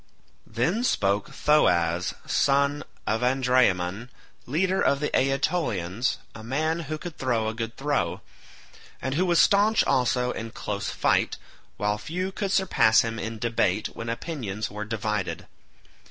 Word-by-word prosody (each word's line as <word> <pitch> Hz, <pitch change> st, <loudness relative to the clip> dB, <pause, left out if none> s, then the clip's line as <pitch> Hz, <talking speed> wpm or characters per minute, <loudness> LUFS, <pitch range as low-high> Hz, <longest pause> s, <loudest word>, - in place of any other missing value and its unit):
Then 165 Hz, -, 0 dB
spoke 100 Hz, -, +1 dB
Thoas 90 Hz, -, +2 dB
son 140 Hz, +1 st, +2 dB, 0.2 s
of 110 Hz, +2 st, 0 dB
Andraemon, 125 Hz, -5 st, +2 dB, 0.4 s
leader 185 Hz, +8 st, +1 dB
of 140 Hz, -, +2 dB
the 150 Hz, -, -1 dB
Aetolians, 130 Hz, -, 0 dB, 0.2 s
a 110 Hz, -, -10 dB
man 155 Hz, +7 st, -1 dB
who 155 Hz, -, -2 dB
could 170 Hz, 0 st, -9 dB
throw 120 Hz, -4 st, 0 dB
a 110 Hz, -, -2 dB
good 115 Hz, 0 st, -5 dB
throw, 145 Hz, +1 st, -1 dB, 0.8 s
and 130 Hz, -, -3 dB
who 180 Hz, +6 st, +1 dB
was 175 Hz, -1 st, +3 dB
staunch 210 Hz, +2 st, +4 dB
also 125 Hz, -2 st, +1 dB
in 115 Hz, 0 st, -5 dB
close 100 Hz, -2 st, -4 dB
fight, -, -, +1 dB, 0.4 s
while 105 Hz, 0 st, 0 dB
few 180 Hz, -, -3 dB
could 195 Hz, 0 st, -3 dB
surpass 180 Hz, -, +4 dB
him 115 Hz, -1 st, -3 dB
in 110 Hz, 0 st, -4 dB
debate 110 Hz, -3 st, 0 dB
when 115 Hz, 0 st, -7 dB
opinions 115 Hz, -, -4 dB
were 105 Hz, +1 st, -5 dB
divided. 105 Hz, -3 st, -3 dB
125 Hz, 140 wpm, -26 LUFS, 110-150 Hz, 0.8 s, staunch